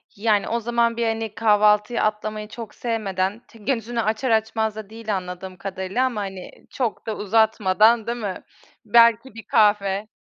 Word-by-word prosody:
Yani, 210 -1 +1
o 235 +1 -1
zaman, 235 0 0
bir 235 - 0
hani, 225 -1 -3
kahvaltıyı 210 +1 +3
atlamayı 215 0 -2
çok 225 0 -9
sevmeden, 205 -3 -2
t 230 - -18
gözünü 230 0 -2
açar 220 +4 -1
açmaz 220 -1 0
da 215 -2 -8
değil 220 -2 -4
anladığım 180 0 -7
kadarıyla 190 +6 -2
ama, 240 -5 -2
hani, 190 -2 -7 0.2
çok 240 -5 -3
da 220 - -3
uzatmadan 220 +1 +3
değil 235 +1 -2
mi? 200 -5 -5 0.4
Belki 230 +2 +4
bir 225 - -9
kahve. 205 -1 +2
215 Hz, 160 wpm, -23 LUFS, 205-230 Hz, 0.4 s, Belki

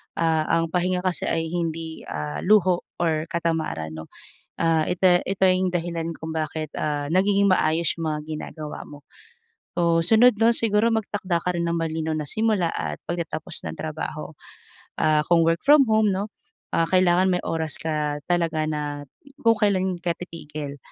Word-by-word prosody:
Ah, 160 -1 +1 0.2
ang 165 - 0
pahinga 180 0 +1
kasi 185 -2 0
ay 165 0 -1
hindi, 165 -2 -4
ah, 75 -1 -4
luho 185 -3 +4 0.2
or 160 -2 +1
katamaran 160 - -2
'no. 80 0 -8 0.5
Ah, 165 -1 +2
ite 180 0 +4
ito 190 0 +1
'yung 185 0 +3
dahilan 170 -1 -2
kung 160 0 -6
bakit, 155 -1 -3
ah, 145 -1 -1
nagiging 200 +2 +3
maayos 165 -2 +2
'yung 165 - -2
mga 150 0 -2
ginagawa 155 0 -6
mo. 145 -1 -13 0.7
So, 170 -1 +2
sunod 225 +3 +6
'no 230 +1 +5
siguro 230 0 +2
magtakda 200 -5 -1
ka 180 -1 -1
rin 170 - -1
ng 170 - 0
malinaw 160 -1 -2
na 150 -2 -3
simula 215 -4 +1
at 75 -1 -4
pagtatapos 165 -2 -3
ng - - -10
trabaho. - - -5 0.7
Ah, 155 -1 +3
kung 170 -1 +4
work 165 +1 0
from 285 -1 +7
home 220 -1 +4
'no, 200 +3 -3 0.4
ah, 165 - +3
kailangan 185 0 +4
may 180 - 0
oras 160 -2 -2
ka 150 -2 -2
talaga 165 -3 +1
na 145 -2 -4 0.3
kung 230 -2 +4
kailan 190 -3 +1
ka 175 0 0
titigil. 150 -5 -7
170 Hz, 165 wpm, -24 LUFS, 155-185 Hz, 0.7 s, from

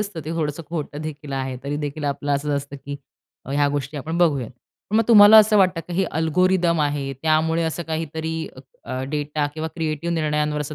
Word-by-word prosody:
असतं 200 -6 -4
ते 155 - -5
थोडंसं 160 -1 -2
खोटं 150 -3 -5
देखील 150 -2 -7
आहे 130 -1 -3
तरी 145 +1 -2
देखील 150 0 -4
आपलं 145 0 -1
असंच 145 +1 -2
असतं 140 0 -6
की 140 0 -5 0.5
ह्या 145 +1 +2
गोष्टी 145 +1 -3
आपण 160 +5 -3
बघूयात. 140 -9 +2 0.4
मग 225 - +5
तुम्हाला 210 -1 +9
असं 215 0 +5
वाटतं 185 -3 +3
का 170 +2 -10
की 175 - -2
हे 190 - +3
अल्गोरिदम 170 +1 +2
आहे. 145 -2 -1
त्यामुळे 160 +1 +2
असं 160 +1 -2
काहीतरी 160 0 -4 0.5
अ, 130 0 -4
डेटा 150 0 -1
किंवा 160 0 -3
क्रिएटिव्ह 165 0 -2
निर्णयांवर 150 -1 0
असा 150 +1 -5
155 Hz, 190 wpm, -22 LUFS, 145-165 Hz, 0.5 s, तुम्हाला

